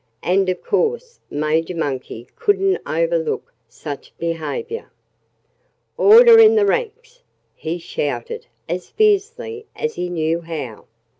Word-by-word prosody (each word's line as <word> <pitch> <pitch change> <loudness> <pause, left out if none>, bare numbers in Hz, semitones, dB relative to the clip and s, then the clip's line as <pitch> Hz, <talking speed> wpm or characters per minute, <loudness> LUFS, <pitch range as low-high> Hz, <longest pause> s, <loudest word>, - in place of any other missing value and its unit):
And 190 +1 +2
of 180 -1 -3
course 475 +3 -1
Major 155 +4 -1
Monkey 130 -6 -4
couldn't 390 -1 +1
overlook - - -1 0.2
such 145 -3 -9
behavior. 165 - -4 1.1
"Order 455 +2 +8
in 445 0 +7
the 425 -2 +4
ranks!" 480 +3 -2 0.3
he 160 +2 -4
shouted 145 -7 -4 0.2
as 180 0 -4
fiercely 440 +2 0
as 465 0 -2
he 180 - -4
knew 165 -1 0
how. 155 -9 -7
385 Hz, 115 wpm, -20 LUFS, -, 1.1 s, Order